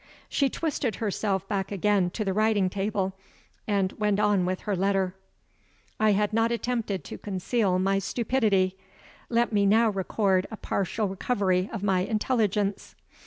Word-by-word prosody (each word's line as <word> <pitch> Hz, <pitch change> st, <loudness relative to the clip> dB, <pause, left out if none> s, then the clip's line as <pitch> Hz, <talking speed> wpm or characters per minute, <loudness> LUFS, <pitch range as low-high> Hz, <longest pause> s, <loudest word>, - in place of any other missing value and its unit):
She 275 Hz, -2 st, +2 dB
twisted 280 Hz, -8 st, -2 dB
herself 200 Hz, -2 st, -1 dB
back 195 Hz, -1 st, -2 dB
again 200 Hz, -2 st, +2 dB
to 215 Hz, -, -2 dB
the 190 Hz, -, 0 dB
writing 210 Hz, -3 st, +2 dB
table, 195 Hz, -1 st, -1 dB, 0.5 s
and 200 Hz, -3 st, +1 dB
went 210 Hz, -1 st, +1 dB
on 205 Hz, -3 st, +3 dB
with 185 Hz, 0 st, -2 dB
her 205 Hz, -, -1 dB
letter. 190 Hz, 0 st, +1 dB, 0.9 s
I 215 Hz, -1 st, +4 dB
have 210 Hz, +1 st, +1 dB
not 225 Hz, +1 st, +2 dB
attempted 230 Hz, -7 st, -2 dB
to -, -, -8 dB
conceal 195 Hz, 0 st, 0 dB
my 195 Hz, +1 st, +2 dB
stupidity. 205 Hz, -4 st, +1 dB, 0.5 s
Let 235 Hz, -1 st, +1 dB
me 200 Hz, -1 st, +3 dB
now 220 Hz, +2 st, +4 dB
record 190 Hz, -1 st, +1 dB
a 220 Hz, -, -7 dB
partial 200 Hz, +3 st, -1 dB
recovery 190 Hz, -1 st, 0 dB
of 210 Hz, -3 st, -5 dB
my 190 Hz, -2 st, +2 dB
intelligence. 210 Hz, -1 st, 0 dB
200 Hz, 150 wpm, -27 LUFS, 190-220 Hz, 0.9 s, I